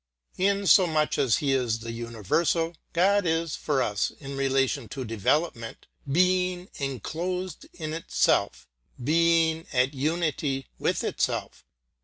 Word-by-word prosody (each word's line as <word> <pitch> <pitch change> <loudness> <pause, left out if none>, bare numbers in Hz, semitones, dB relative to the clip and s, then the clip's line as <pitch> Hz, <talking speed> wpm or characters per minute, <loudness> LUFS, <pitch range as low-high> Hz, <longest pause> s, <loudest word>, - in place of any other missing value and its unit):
In 200 +1 +2
so 185 +1 +6
much 155 -2 0
as 125 -6 +3
He 140 -2 0
is 125 -4 +1
the 115 0 -5
universal, 120 - -1 0.2
God 195 +2 +3
is, 165 -1 0
for 140 -4 0
us, 105 -3 0
in 140 -1 -9
relation 135 -2 0
to 130 -2 -5
development, 115 - -1 0.3
Being 180 +2 +2
enclosed 170 - -4
in 155 -2 -6
itself, 65 - 0 0.4
Being 165 +2 +2
at 130 +2 +2
unity 145 -2 -1
with - - 0
itself. - - -2
155 Hz, 125 wpm, -26 LUFS, 130-170 Hz, 0.4 s, so